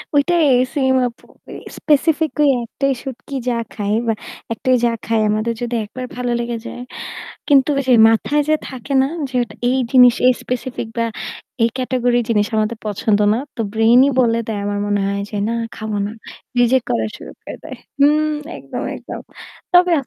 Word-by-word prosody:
ঐটাই 325 +2 +3 0.3
সেম 265 -2 +2
আপু। 235 - -12 0.5
স্পেসিফিকালি 305 0 +2 0.2
একটাই 275 +3 -1
শুটকি 270 +1 -7
যা 235 - 0 0.2
খায় 205 0 -1
বা 225 - +3 0.4
একটাই 255 +3 +1
যা 235 - +3
খায় 225 -1 +1
আমাদের 215 +2 0
যদি 240 0 -2
একবার 255 +4 -7
ভালো 245 -1 -2
লেগে 235 0 -2
যায়। 245 - -7 0.7
কিন্তু 275 -1 +5
ওই 275 - +1
যে 255 - +6 0.2
মাথায় 290 +6 +2
যে 310 - +4
থাকে 260 +1 -7
না, 270 - +1 0.2
যে 260 - -16
ওটা 215 -3 -7 0.2
এই 260 - +1
জিনিস, 250 -3 +7
এই 255 - +7
স্পেসিফিক 250 -1 -4
বা 230 - +2 0.6
এই 230 - +5
ক্যাটেগরির 245 -1 +1
জিনিস 210 -3 +2
আমাদের 215 +1 0
পছন্দ 210 0 +1
না। 225 - +1 0.2
তো - - -4
ব্রেইন 225 +3 +5
ই - - +2
বলে 230 -2 +2
দেয়। 210 -2 -2
আমার 205 0 -2
মনে 205 0 +1
হয়, 200 0 -1
যে, 210 - -4
"না - - -1 0.2
খাবো 215 -1 -4
না।" 210 - -5 0.5
রিজেক্ট 245 +1 +3
করা 110 -1 +1
শুরু - - -10
করে - - -8
দেয়। - - -7 0.2
হু 280 - +7 0.5
একদম, - - -6
একদম। - - -8 0.5
তবে,। 355 0 +6
240 Hz, 175 wpm, -19 LUFS, 220-265 Hz, 0.7 s, জিনিস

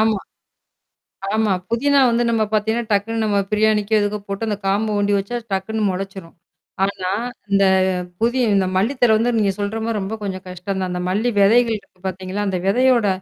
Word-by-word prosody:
ஆமா, 220 -2 +2 1.1
ஆமா. 220 -2 +2 0.2
புதினா 280 +5 +2
வந்து 235 +1 +1
நம்ம 225 -1 +1
பாத்தீங்கன்னா 220 +2 0
டக்குன்னு 220 +3 0
நம்ம 205 -2 +1
பிரியாணிக்கோ, 215 0 +1
எதுக்கோ 205 +1 -1
போட்டு 200 +3 -3
அந்தக் 205 -2 -4
காம்பு 205 +3 +1
ஒண்டி 205 0 +1
வச்சா 200 +5 -4 0.2
டக்குன்னு 215 +3 -2
முளைச்சிரும். 190 -2 -6 0.5
ஆனா 195 -2 -2 0.4
இந்த 200 0 +4 0.6
புதி 240 +3 +1 0.2
இந்த 190 -1 +2
மல்லி 205 +8 +2
தழை 240 -3 +5
வந்து 230 +3 +1
நீங்கச் 200 -2 0
சொல்ற 205 +2 -2
மாரி 225 -2 -1
ரொம்ப 195 +3 -4
கொஞ்சம் 190 -2 -5
கஷ்டம் 185 +2 -5
தான். 185 -1 -2
அந்த 180 0 -3
மல்லி 210 +6 +1
விதைகள் 225 +2 +4
இருக்கு 185 -2 -26
பாத்தீங்களா, 190 +2 -3
அந்த 185 - -1
விதையோட 240 +1 +3
205 Hz, 175 wpm, -20 LUFS, 195-225 Hz, 1.1 s, தழை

